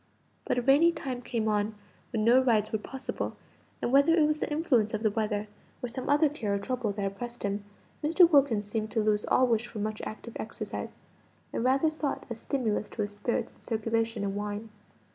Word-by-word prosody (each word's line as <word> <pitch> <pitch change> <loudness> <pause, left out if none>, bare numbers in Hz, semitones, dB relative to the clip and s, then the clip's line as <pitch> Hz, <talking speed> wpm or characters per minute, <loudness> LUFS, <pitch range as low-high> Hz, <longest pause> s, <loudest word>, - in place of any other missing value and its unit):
But - - 0
a 245 - +1
rainy 290 +7 +6
time 255 -6 -4
came 230 -3 -2
on, 210 0 +1 0.4
when 220 -2 0
no 245 +3 +6
rides 220 -5 +2
were 220 - 0
possible; 265 +5 -5 0.5
and - - 0
whether 280 +5 +6
it 315 -3 +5
was 305 0 +1
the - - -2
influence 255 -9 +2
of 215 - -4
the 215 - +3
weather, 210 -1 -1 0.4
or 245 - -2
some 260 +3 -5
other 295 +2 +5
care 225 -9 -2
or - - +1
trouble 245 +1 -2
that 200 0 -2
oppressed 235 +5 -5
him, 200 0 -1 0.4
Mr. 335 +4 +6
Wilkins 275 -10 +4
seemed 215 +1 -3
to 220 - +2
lose 210 -1 +2
all 255 - +4
wish 235 -1 +1
for 235 - -9
much 215 +1 -3
active 225 +1 -7
exercise, - - -5 0.6
and - - -1
rather 270 +5 +3
sought 310 -2 -3
a - - -2
stimulus 220 -4 -1
to 215 - -2
his 205 0 -5
spirits 210 +4 -2
and - - -25
circulation 225 -1 -1
in 200 -1 -1
wine. 205 +2 -4
230 Hz, 205 wpm, -29 LUFS, 210-265 Hz, 0.6 s, rainy